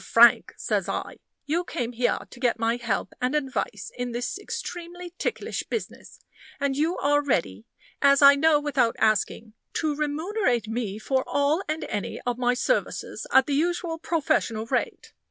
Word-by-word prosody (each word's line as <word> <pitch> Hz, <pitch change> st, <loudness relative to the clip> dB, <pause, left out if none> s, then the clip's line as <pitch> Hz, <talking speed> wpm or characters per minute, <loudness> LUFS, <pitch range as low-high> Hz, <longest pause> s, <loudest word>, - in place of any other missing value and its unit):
Frank," 235 Hz, 0 st, +5 dB
says -, -, -1 dB
I, -, -, -4 dB, 0.3 s
"you 325 Hz, +5 st, 0 dB
came 245 Hz, -8 st, -3 dB
here 245 Hz, 0 st, +1 dB
to 245 Hz, -, -12 dB
get 245 Hz, -2 st, +1 dB
my 230 Hz, +1 st, +1 dB
help 225 Hz, -5 st, -2 dB
and 250 Hz, +4 st, 0 dB
advice 275 Hz, -3 st, -2 dB
in 245 Hz, -1 st, -4 dB
this 245 Hz, +10 st, -3 dB
extremely 350 Hz, -3 st, -6 dB
ticklish -, -, -2 dB
business, 455 Hz, -, -6 dB, 0.4 s
and 280 Hz, -1 st, 0 dB
you 320 Hz, +5 st, 0 dB
are 290 Hz, +1 st, +2 dB
ready, 115 Hz, -, -1 dB, 0.4 s
as 280 Hz, -1 st, +6 dB
I 280 Hz, 0 st, +10 dB
know 300 Hz, +1 st, +4 dB
without 275 Hz, -6 st, +1 dB
asking, 215 Hz, 0 st, +1 dB, 0.2 s
to 310 Hz, -2 st, 0 dB
remunerate 300 Hz, -, 0 dB
me 220 Hz, -3 st, -3 dB
for 260 Hz, +4 st, 0 dB
all 285 Hz, +5 st, +1 dB
and 310 Hz, +1 st, -2 dB
any 205 Hz, -, -4 dB
of 245 Hz, 0 st, -2 dB
my 245 Hz, 0 st, +2 dB
services -, -, -1 dB
at 265 Hz, -, +6 dB
the 290 Hz, -, -2 dB
usual 335 Hz, +2 st, 0 dB
professional 275 Hz, -9 st, 0 dB
rate. -, -, -2 dB
275 Hz, 160 wpm, -26 LUFS, 235-315 Hz, 0.4 s, I